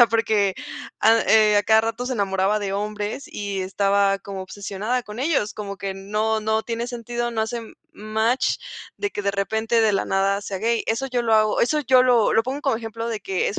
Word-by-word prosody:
O 240 - +9
sea, - - -20
porque 215 -3 +1 0.5
a 225 +1 +5
eh, 215 -1 +5
a - - +2
cada 220 +1 +4
rato 230 +2 -3
se 255 - -2
enamoraba 195 0 +1
de 200 -2 -3
hombres 210 +5 -3
y 200 -2 -4
estaba 195 +1 +1
como 195 -1 -7
obsesionada 205 +5 -3
con 210 +2 -10
ellos 270 -7 0
como 200 -2 -6
que 195 0 -4
no, 210 +3 -1
no 220 +1 0
tiene 235 0 -3
sentido, 240 0 -4
no 220 -1 -1
hace 235 +2 -3 0.3
match 220 +4 0 0.4
de 410 - -2
que 205 - -4
de 200 0 0
repente 220 +4 0
de 215 -2 +3
la 195 - 0
nada 195 +1 +1
sea 195 -1 -5
gay. 230 +2 0
Eso 230 +5 -1
yo 250 -1 0
lo 225 -2 +2
hago 215 -1 +3
eso 300 +5 +2
yo 255 -1 +5
lo 245 -4 +4
lo 225 - +4
pongo 270 +3 -3
como 275 -6 +1
ejemplo 225 0 -5
de 225 -2 -2
que 190 -1 -1
es - - -4
220 Hz, 220 wpm, -23 LUFS, 200-235 Hz, 0.5 s, O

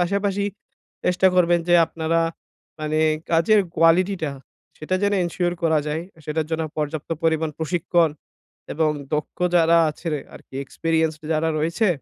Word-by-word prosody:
পাশাপাশি 200 +2 0 0.6
চেষ্টা 180 +1 +3
করবেন 175 -1 +4
যে, 175 - +5
আপনারা 165 0 -1 0.6
মানে, 155 0 -1 0.3
কাজের 170 +6 +4 0.2
কোয়ালিটিটা, 165 0 +3 0.5
সেটা 155 +4 -2
যেন 205 0 +2
এনশিওর 175 0 -1
করা 160 -2 +3
যায়, 155 +2 -2 0.2
সেটার 155 0 -2
জন্য 160 0 -1
পর্যাপ্ত 150 0 -3
পরিমাণ 160 -1 +1
প্রশিক্ষণ 170 0 +1 0.6
এবং 160 0 +2 0.2
দক্ষ 150 -1 -3 0.2
যারা 170 0 +5
আছে 160 +3 -8 0.3
আরকি, 135 - -14
এক্সপেরিয়েন্সড 160 +2 -1
যারা 160 +1 +1
রয়েছে, 170 +7 +1
165 Hz, 130 wpm, -23 LUFS, 155-175 Hz, 0.6 s, যে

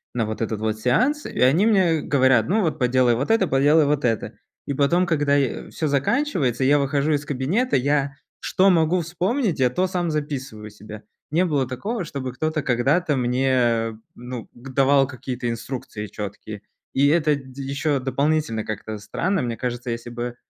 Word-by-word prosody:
на 115 -2 +1
вот 110 +1 -5
этот 110 -1 -3
вот 110 0 -2
сеанс, 260 - +1
и - - -6
они 140 +11 +4
мне 185 -8 +3
говорят: 130 -6 +3
"Ну 220 +3 +2
вот, 165 -5 -1
поделай 125 -1 +3
вот 135 - -1
это, 225 -4 +3
поделай 145 +3 +4
вот 145 -1 0
это". 115 -3 -1 0.3
И 140 - -1
потом, 170 +6 +2
когда 145 -4 +2
я 140 -4 -1
всё 155 - -2
заканчивается, 140 - 0
я 140 +3 +4
выхожу 140 +1 0
из 145 0 -1
кабинета, 150 - 0
я 140 +1 +1 0.3
что 190 +1 +2
могу 170 0 +3
вспомнить, 180 - -1
я 130 -1 +4
то 185 +8 0
сам 175 -2 -2
записываю 135 -8 -4
себе. 105 +1 -11 0.3
Не 170 +4 +3
было 145 -6 0
такого, 195 - -4
чтобы 135 -4 -5
кто-то 155 +4 -1
когда-то 140 +6 +1
мне, 120 -3 +1 0.2
ну, 125 -1 -8
к 125 +3 -12
давал 135 0 +4
какие-то 125 -2 -5
инструкции 115 -2 -5
чёткие. 105 0 -7 0.3
И 140 +1 +3
это 155 0 +3
дь 135 -2 -11
еще 140 +1 -1
дополнительно 135 -3 0
как-то 110 0 -5
странно. 180 - -1
Мне 120 -2 -3
кажется, 125 0 -4
если 115 +1 -5
бы, 120 0 -5
135 Hz, 175 wpm, -23 LUFS, 120-155 Hz, 0.3 s, они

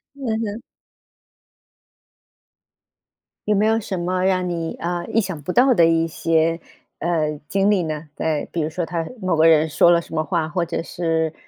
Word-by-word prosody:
嗯 275 -2 -7 0.2
哼。 215 +1 -5 2.9
有 210 - +3
没 205 +2 +2
有 225 +1 +2
什 195 -4 -4
么 180 +1 -1
让 185 -1 +1
你， 165 -2 -3
呃， 175 0 -3
意 225 - +1
想 190 -7 -3
不 165 - -4
到 255 +5 +5
的 170 -7 +5
一 165 0 +2
些， 165 0 +1 0.4
呃， 155 -3 -1
经 195 +1 +2
历 195 -3 +2
呢？ 155 -1 -5
对， 155 -2 -2
比 170 - -2
如 155 - -1
说 175 +1 -3
他 165 -1 -3
某 185 -4 0
个 160 +1 +5
人 160 -1 +5
说 160 +2 +4
了 170 -1 +5
什 - - -13
么 155 -1 0
话， 165 -1 -1
或 175 +2 -1
者 165 0 -3
是 165 -2 -1
170 Hz, 195 characters per minute, -21 LUFS, 160-185 Hz, 2.9 s, 到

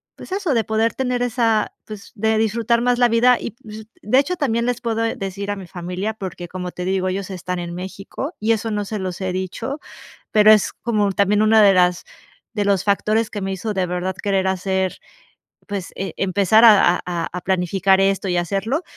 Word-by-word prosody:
pues - - -12
eso, 380 -6 -1
de 230 -2 +2
poder 220 +2 0
tener 250 -2 -1
esa, 230 -3 +1
pues, 215 -1 -10
de 220 +1 +1
disfrutar 225 +2 +1
más 245 0 +1
la 245 - +5
vida. 235 +2 +4
Y, - - -5
pues, 220 -3 -11 0.2
de 255 +6 +3
hecho, 340 +6 0
también 235 -4 0
les 245 0 -1
puedo 225 -1 -1
decir 200 -4 -4
a 205 - -2
mi 190 -2 -9
familia 180 +4 -4
porque, 185 -4 -7
como 180 0 -6
te 180 - -6
digo, 190 0 0
ellos 195 +1 -4
están 180 0 -4
en 170 0 -5
México 195 - -6
y 220 +2 +1
eso 225 0 -3
no 205 -1 -2
se 215 +2 -4
los 185 -1 -4
he 190 -2 -2
dicho, 210 - -4 0.5
pero 215 0 +6
es 215 -2 +3
como 210 -4 -1
también 205 +2 +2
una 220 0 +5
de 200 -2 +6
las 180 -1 +2 0.5
de 210 -2 0
los 200 -2 +2
factores 215 +2 +1
que 205 - -5
me 195 0 -2
hizo 205 +3 -4
de 190 - 0
verdad 180 +1 -3
querer 195 -2 0
hacer, 190 0 -1 0.7
pues, 200 -3 -5
eh, 195 - -4
empezar 200 +3 +3
a 195 -5 +6
a 170 -2 -2
a 180 - -4
planificar 190 +1 +2
esto 195 0 +1
y 180 - 0
hacerlo, 200 - -1
200 Hz, 205 wpm, -20 LUFS, 185-225 Hz, 0.7 s, pero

